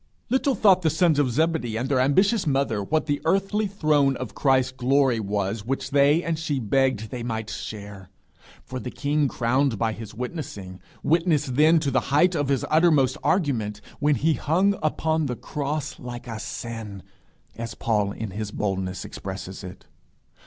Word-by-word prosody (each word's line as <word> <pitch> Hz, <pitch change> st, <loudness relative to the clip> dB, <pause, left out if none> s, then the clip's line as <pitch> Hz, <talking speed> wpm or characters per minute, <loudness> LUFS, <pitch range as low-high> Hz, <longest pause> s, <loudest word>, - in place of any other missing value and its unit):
Little 265 Hz, +1 st, +2 dB
thought 190 Hz, -3 st, +5 dB
the 160 Hz, -, +2 dB
sons 160 Hz, -1 st, +2 dB
of 140 Hz, -3 st, +2 dB
Zebedee 150 Hz, -4 st, 0 dB
and 125 Hz, +3 st, -2 dB
their 135 Hz, -2 st, +1 dB
ambitious 190 Hz, -, +3 dB
mother 135 Hz, -7 st, +1 dB
what 155 Hz, +9 st, 0 dB
the 145 Hz, -2 st, -1 dB
earthly 195 Hz, +4 st, +1 dB
throne 150 Hz, -8 st, +2 dB
of 130 Hz, -, -6 dB
Christ's 130 Hz, -2 st, +2 dB
glory 130 Hz, -1 st, +2 dB
was 100 Hz, 0 st, -2 dB
which 135 Hz, +4 st, -3 dB
they 145 Hz, +4 st, +4 dB
and 165 Hz, -1 st, -2 dB
she 150 Hz, -3 st, -1 dB
begged 125 Hz, -1 st, 0 dB
they 125 Hz, -, -5 dB
might 110 Hz, -2 st, -4 dB
share. 100 Hz, -3 st, -7 dB, 0.5 s
For 130 Hz, -, -6 dB
the 125 Hz, -, -5 dB
king 145 Hz, +2 st, 0 dB
crowned 130 Hz, 0 st, +1 dB
by 110 Hz, +1 st, 0 dB
his 110 Hz, -1 st, -9 dB
witnessing, 105 Hz, -, -6 dB, 0.2 s
witnessed 155 Hz, -5 st, +1 dB
then 155 Hz, +4 st, +5 dB
to 140 Hz, -3 st, -1 dB
the 130 Hz, -, +3 dB
height 175 Hz, +6 st, +4 dB
of 145 Hz, -4 st, 0 dB
his 135 Hz, -1 st, 0 dB
uttermost 155 Hz, -5 st, +4 dB
argument, 115 Hz, -, 0 dB, 0.2 s
when 145 Hz, 0 st, +3 dB
he 160 Hz, +3 st, +2 dB
hung 185 Hz, +8 st, +2 dB
upon 160 Hz, 0 st, 0 dB
the 125 Hz, -, -3 dB
cross 145 Hz, +3 st, -4 dB
like 120 Hz, 0 st, -8 dB
a 115 Hz, -2 st, -5 dB
sin, 110 Hz, -3 st, -6 dB, 0.5 s
as 115 Hz, -1 st, -6 dB
Paul 105 Hz, -3 st, 0 dB
in 110 Hz, 0 st, -5 dB
his 105 Hz, +2 st, -4 dB
boldness 95 Hz, -3 st, -3 dB
expresses 95 Hz, 0 st, -7 dB
it. 90 Hz, 0 st, -10 dB
135 Hz, 170 wpm, -24 LUFS, 110-155 Hz, 0.5 s, thought